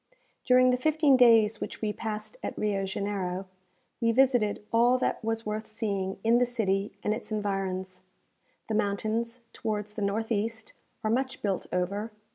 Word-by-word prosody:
During 255 0 +6
the 250 - +2
fifteen 305 -1 +4
days 230 -4 +5
which - - -5
we 210 -1 -1
passed 215 0 -5
at - - -5
Rio 200 -2 0
Janeiro, 190 -1 -3 0.6
we 230 0 +3
visited 240 -5 +2
all 240 +2 +5
that 255 - -1
was 225 0 -2
worth 215 +1 -3
seeing 200 -3 -2
in 230 +2 +4
the 250 - +4
city 205 -4 0
and 210 - +1
its 220 - -7
environs. 195 -3 -2 0.7
The 220 - -2
mountains, 220 +3 -1
towards 210 -2 -3
the 215 - -5
north 215 +3 -1
east, 220 +1 -2 0.3
are 215 - +1
much 260 +2 -1
built 195 -3 -1
over. 200 +5 -1
215 Hz, 160 wpm, -28 LUFS, 200-230 Hz, 0.7 s, During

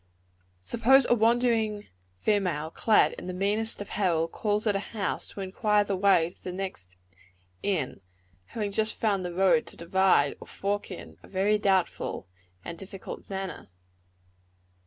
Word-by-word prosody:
Suppose 250 - +4
a - - +5
wandering 225 -2 +2 0.3
female, 170 - 0
clad 220 +4 +3
in - - -8
the 185 - -4
meanest 210 +4 -1
apparel, 180 -5 0
calls 210 +5 -1
at 210 -2 +2
a - - +1 0.2
house, 200 - -2
to 200 - -8
inquire 205 +2 +2
the 200 -1 -2
way 185 -3 +3
to - - -24
the 180 - -4
next 180 - -6 0.6
inn, 165 - -1 0.4
having 210 - -4
just 220 +2 0
found 200 -4 0
the 180 - -3
road 180 -4 +3
to - - -10
divide 170 -4 +3
or - - -10
fork 205 +1 -3
in, 185 - -9
a - - -15
very 200 +2 +1
doubtful 190 - 0 0.4
and 170 -1 -6
difficult 195 0 -9
manner. 190 - -5
195 Hz, 150 wpm, -28 LUFS, 180-210 Hz, 0.6 s, a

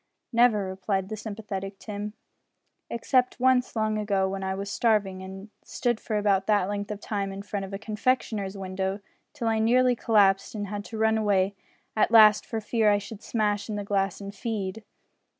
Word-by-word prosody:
"Never," 230 -4 +4
replied 190 0 -2
the 215 - -3
sympathetic 200 -2 -6
Tim, 210 0 -6 0.8
"except 250 +2 +1
once 255 0 +3
long 215 -1 0
ago 200 -2 +1
when 195 0 -4
I 190 0 -1
was 200 +1 -5
starving, 205 -4 +1
and 190 +2 -9
stood 240 -2 -1
for 215 - -2
about 200 -2 +2
that 205 -3 +3
length 205 0 -3
of 210 -1 -4
time 200 -2 -3
in 195 +1 -7
front 200 -1 -4
of 190 - -10
a 195 - -3
confectioner's 215 -2 -1
window 190 +1 -3 0.3
till 255 -6 -3
I 225 -1 +2
nearly 250 +3 +4
collapsed 205 -3 +3
and 205 -2 -4
had 205 0 -4
to 225 - -7
run 220 0 +3
away 200 -2 +2 0.4
at 215 - +3
last 215 -2 +7
for 225 - -2
fear 220 0 +2
I 205 - +4
should 205 +1 -8
smash 210 -2 -1
in 215 - -2
the 205 - -3
glass 195 -2 0
and 200 0 -7
feed." 210 -1 -4
205 Hz, 185 wpm, -27 LUFS, 195-220 Hz, 0.8 s, last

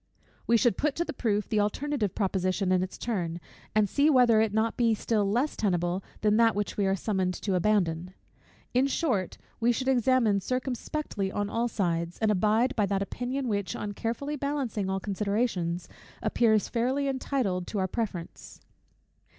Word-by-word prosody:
We 235 - +5
should 225 -2 +2
put 300 -1 0
to 340 - -1
the - - -5
proof 210 -5 0
the 215 - +1
alternative 215 +1 -1
proposition 190 -1 0
in 185 -1 +3
its 185 0 -4
turn, 175 -8 -2 0.4
and 215 -1 +4
see 285 +9 +3
whether 245 -6 +5
it 220 - +2
be 205 - -7
not 225 +3 0 0.2
still 210 -3 0
less 245 +8 0
tenable 180 -2 0 0.2
than 210 0 +3
that 230 -2 +4
which 205 0 -2
we 200 -2 +1
are 190 - +2
summoned 190 -3 -1
to 195 - -2
abandon. 180 -2 +1 0.6
In 255 +2 +3
short, 255 - -1 0.2
we 235 +1 +3
should 260 +2 -2
examine 245 -5 +3
circumspectly 255 - -3
on 205 +1 -2
all 235 +1 0
sides; 170 -6 -1
and 220 -1 +2
abide 215 +6 +2
by 210 -3 +2
that 195 0 0
opinion 250 +5 -3
which, 200 -3 -1
on 205 - -4
carefully 240 +8 -3
balancing 270 -8 -2
all 190 0 0
considerations, 200 -3 -1 0.4
appears 220 -3 +3
fairly 260 +4 0
entitled 255 -9 -1
to 215 - -4
our 190 -1 +1
preference. 190 -5 -5
215 Hz, 170 wpm, -28 LUFS, 190-245 Hz, 0.6 s, We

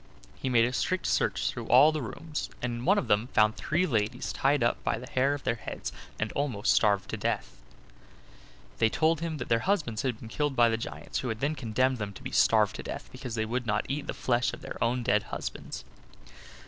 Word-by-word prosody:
He 130 - -3
made 115 -2 +5
a 125 - -2
strict 185 +7 0
search - - +1
through - - -4
all 140 +5 +7
the 155 -1 -2
rooms, 150 +7 -5
and 125 -1 -2
in 120 +1 -5
one 200 +5 +5
of 200 - 0
them 105 +3 +2
found 110 -3 +3
three 175 +4 0
ladies 120 -2 -1
tied 140 -1 +2
up 120 - +1
by - - 0
the 125 - -8
hair 135 +3 +2
of 145 - -9
their - - +1
heads, 110 -4 -6 0.3
and 110 -1 -1
almost 130 -8 +1
starved 100 -3 +3
to - - -2
death. - - -2 1.2
They 115 - +4
told 160 +5 +2
him 165 -2 -2
that 120 - -5
their 115 - +3
husbands 150 - 0
had 125 -4 -2
been 115 - -9
killed 145 +4 -1
by 120 -1 +5
the 115 - +1
giants, 115 - -5
who 130 - -3
had 110 -1 -3
then 145 +4 0
condemned 130 -1 0
them 100 -1 -4
to - - -12
be - - -5
starved - - +4
to - - -5
death - - -7
because 130 -3 -6
they 110 -1 0
would 120 +2 -2
not 105 -1 +1
eat 140 +2 -3
the - - -3
flesh 120 -1 +1
of - - -8
their - - -4
own 120 +2 +1
dead 105 -4 +3
husbands. - - -6
125 Hz, 230 wpm, -29 LUFS, 110-145 Hz, 1.2 s, all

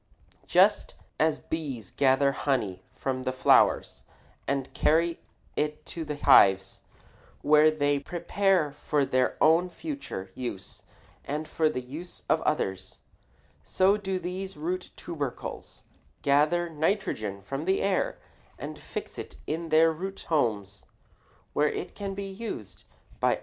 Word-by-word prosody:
Just - - +4 0.2
as 155 -1 +2
bees 135 - -5
gather 140 0 +3
honey 115 -11 -1
from 130 -1 -2
the 130 0 -1
flowers 130 - +3 0.4
and 135 -1 -2
carry 165 +2 +2 0.4
it 150 0 -2
to 165 - -5
the 150 -1 -4
hives, 95 -8 +5 0.6
where 150 +1 +6
they 145 -2 +1
prepare 175 +1 +1
it - - -15
for 145 -2 +1
their 130 -1 +1
own 165 +3 +4
future 280 - -6
use 120 -7 -6 0.4
and 150 +2 -4
for 160 -1 +1
the 125 - -3
use 155 +8 -9
of - - +3
others, 95 -1 -2 0.6
so 190 +2 +3
do 195 -2 -2
these 185 0 -5
root 180 +4 -3
tubercles 145 -7 -6 0.4
gather 150 +5 +3
nitrogen 155 - -1
from 135 +10 -5
the 190 +1 +2
air 195 -2 0 0.4
and - - -7
fix - - -7
it - - -7
in 165 +2 -3
their 160 +1 +5
root 190 +5 -6
homes, 105 - 0 0.7
where 150 0 +3
it - - -5
can 200 -1 -5
be 200 - -4
used 195 - -7 0.3
by - - +3
other - - 0
crops. - - -11
150 Hz, 140 wpm, -28 LUFS, 130-175 Hz, 0.7 s, where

